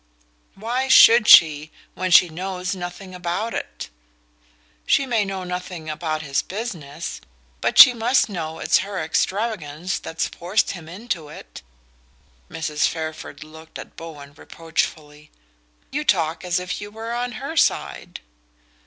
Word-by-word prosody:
"Why 240 +6 -2
should 235 -3 +7
she, 155 -1 +7 0.2
when 185 0 -3
she 180 0 +7
knows 185 +2 -4
nothing 185 +1 -8
about 180 +5 -3
it?" - - -6 1.0
"She 275 - +3
may 235 -5 +1
know 195 -1 -5
nothing 180 -3 -6
about 155 0 -3
his 140 -2 0
business; 170 - -6 0.4
but - - -1
she 250 - +11
must 240 +3 +2
know 160 -6 -5
it's - - +2
her 195 0 -4
extravagance 175 -1 -2
that's 160 - -3
forced 185 +5 -1
him 165 -4 -9
into 185 -5 -5
it." - - -12 0.9
Mrs. 155 -2 -1
Fairford 160 -1 -6
looked 160 +1 -13
at - - -11
Bowen 145 -4 -10
reproachfully. 150 -2 -5 0.6
"You 300 +2 -2
talk 165 - 0
as 180 0 0
if 180 +2 -5
you 205 - -7
were 225 +2 -6
on 245 0 -3
her 280 +6 -6
side!" - - -1
180 Hz, 135 wpm, -22 LUFS, 160-210 Hz, 1.0 s, she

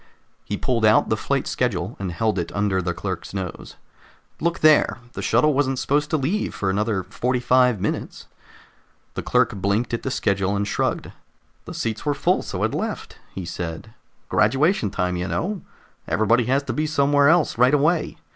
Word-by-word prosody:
He 105 - -4
pulled 120 -1 -1
out 110 0 +4
the 110 - +2
flight 135 +5 -1
schedule 100 -5 -2
and 95 -2 -3
held 105 +2 0
it 85 - -4
under 100 -2 0
the 90 0 -2
clerk's 90 +2 -5
nose. 95 -3 -6 0.6
"Look 170 +1 -1
there! 155 -3 +5 0.2
The - - -5
shuttle 150 0 +3
wasn't 135 -1 +1
supposed 145 +3 0
to 155 - +1
leave 165 +10 -1
for 95 -1 -1
another 105 -1 0
forty 125 +7 -1
five 125 -2 +3
minutes!" - - -4 0.9
The - - -4
clerk - - +2
blinked 100 +5 -1
at 115 - -1
the - - -3
schedule, 100 -5 0
and 100 0 -1
shrugged. - - -1 0.5
"The - - -8
seats 110 -2 -3
were 145 -1 0
full, - - +1
so - - -4
it - - 0
left," - - -4 0.2
he 95 - -5
said. 85 +4 -6 0.3
"Graduation 135 - +2
time, 90 -1 -1
you 90 +1 -3
know. 195 - -2 0.5
Everybody 115 +2 +2
has 135 +3 +1
to - - -3
be 155 +1 -1
somewhere 145 -1 +3
else, 165 -7 +2
right 125 +1 +6
away. 155 +3 +1
115 Hz, 180 wpm, -23 LUFS, 95-140 Hz, 0.9 s, right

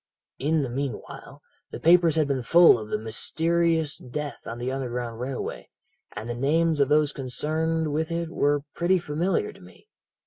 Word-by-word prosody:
"'In 150 +2 +1
the 130 - -3
meanwhile 135 +1 -6 0.3
the - - -7
papers 170 -1 +5
had 155 -2 +2
been 135 -2 -1
full 170 +1 +6
of 105 -1 -8
the - - 0
mysterious 160 +8 0
death 140 0 -6
on 115 - -5
the 125 +2 -3
Underground 125 -3 -4
Railway, 130 +1 -5 0.5
and 110 +2 -6
the 120 - -3
names 155 +5 +1
of 140 -1 +3
those 150 -1 +3
connected 155 +4 -1
with 155 +2 -1
it 165 -1 -3
were 145 -3 +1
pretty 180 +2 +2
familiar 180 - -1
to - - -18
me. - - -17
150 Hz, 170 wpm, -25 LUFS, 130-165 Hz, 0.5 s, full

